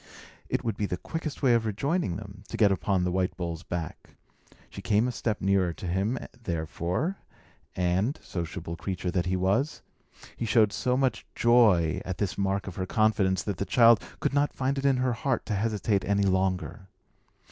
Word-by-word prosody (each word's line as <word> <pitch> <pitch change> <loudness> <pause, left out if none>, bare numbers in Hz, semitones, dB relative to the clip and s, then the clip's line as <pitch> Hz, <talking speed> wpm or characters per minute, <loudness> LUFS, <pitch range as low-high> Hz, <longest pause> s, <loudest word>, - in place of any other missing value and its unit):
It - - -1
would 115 -3 -2
be 105 - -1
the 90 - -3
quickest 160 - -5
way 125 -3 +5
of 115 -1 +3
rejoining 110 - -1
them, 100 -1 -9
to - - -6
get 105 -3 +5
upon 95 0 +1
the 90 - 0
white 95 0 -1
bull's 85 -2 -4
back. 85 -3 -6 0.5
She - - -9
came 110 +3 +2
a - - -1
step 110 -3 -2
nearer 95 -2 +2
to 90 - -9
him, 95 +8 0 0.2
therefore; 85 - -2 0.6
and 90 - 0
sociable 85 -1 -5
creature 90 0 -3
that 90 0 0
he 95 - +1
was 100 +11 0 0.5
he 115 - -3
showed 105 -2 +4
so 125 0 0
much 130 -4 0
joy 105 -9 +4
at 95 -2 -4
this 100 -3 -1
mark 100 0 -1
of 95 - -8
her 95 -1 -2
confidence, 100 -4 +2
that 100 -4 -3
the - - -1
child 115 -2 +6 0.2
could - - -1
not 145 +1 +2
find 135 +1 -1
it 135 - -4
in 135 -2 +4
her 130 -1 +1
heart 130 +2 -1
to 110 - -2
hesitate 105 -1 0
any 100 +1 +1
longer. 95 +1 0
100 Hz, 190 wpm, -28 LUFS, 90-120 Hz, 0.6 s, child